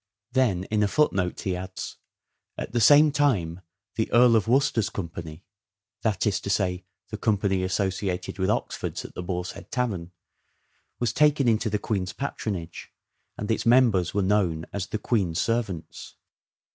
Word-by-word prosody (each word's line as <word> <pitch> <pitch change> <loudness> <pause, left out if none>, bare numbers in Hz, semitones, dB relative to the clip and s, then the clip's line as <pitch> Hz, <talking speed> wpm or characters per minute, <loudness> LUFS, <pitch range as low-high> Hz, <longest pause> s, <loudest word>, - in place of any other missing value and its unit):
Then 120 -9 +2
in 105 -1 +2
a 105 - +3
footnote 95 -9 +1
he 95 -2 -1
adds, 95 +1 -6 0.3
" - - -54
At - - -5
the 120 - 0
same 145 +6 +7
time 100 - +1 0.4
the 110 - -1
Earl 120 0 +6
of 110 -3 +2
Worcester's 125 -3 +2
company 85 -2 -7 0.6
(that 110 -2 0
is 105 -1 +1
to 100 - -6
say 90 -2 0 0.2
the 110 -1 -6
company 100 -4 +1
associated 95 0 -2
with 95 +1 +1
Oxford's 105 - -2
at - - -9
the - - -5
Boar's 90 0 -3
Head - - -12
Tavern) 100 -9 -2 0.9
was 120 -1 -1
taken 145 -1 +3
into 110 -1 +2
the 105 - 0
Queen's 95 -3 -2
patronage, 100 -11 -5 0.5
and 105 - -3
its 110 - 0
members 115 -8 +4
were 100 0 0
known 95 -5 +1
as 100 -2 -3
the - - -3
Queen's 95 -7 0
servants." 100 -9 -3
100 Hz, 160 wpm, -26 LUFS, 90-115 Hz, 0.9 s, same